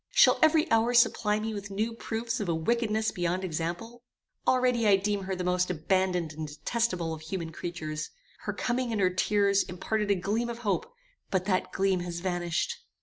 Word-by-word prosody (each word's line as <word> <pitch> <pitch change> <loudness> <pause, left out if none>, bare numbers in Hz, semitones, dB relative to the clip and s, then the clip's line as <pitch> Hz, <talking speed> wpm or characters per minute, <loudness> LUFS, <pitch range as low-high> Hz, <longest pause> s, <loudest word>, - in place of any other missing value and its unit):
Shall - - +5
every 315 0 +5
hour 225 +2 +3
supply 220 -3 +4
me 220 +1 -3
with 200 -1 -6
new 215 +4 -1
proofs 230 0 -3
of 200 -4 -2
a 165 - +2
wickedness 220 +5 0
beyond 175 +1 -1
example? 175 +8 -4 0.5
Already 250 -3 +3
I 200 - +7
deem 200 0 -1
her 190 0 -2
the 180 - -3
most 180 0 +1
abandoned 180 -1 0
and 155 0 -5
detestable 175 +2 -1
of 155 - -7
human 165 0 -4
creatures. 155 -2 -5 0.3
Her - - -4
coming 245 0 -1
and 220 - -1
her 185 -2 +3
tears 200 +2 +2
imparted 205 +4 -2
a 200 - +4
gleam 210 +6 -1
of 235 - -4
hope, 450 - 0 0.4
but 185 -1 0
that 185 -2 0
gleam 190 -1 +1
has 175 -1 -4
vanished." 175 - -1
195 Hz, 185 wpm, -29 LUFS, 175-225 Hz, 0.5 s, I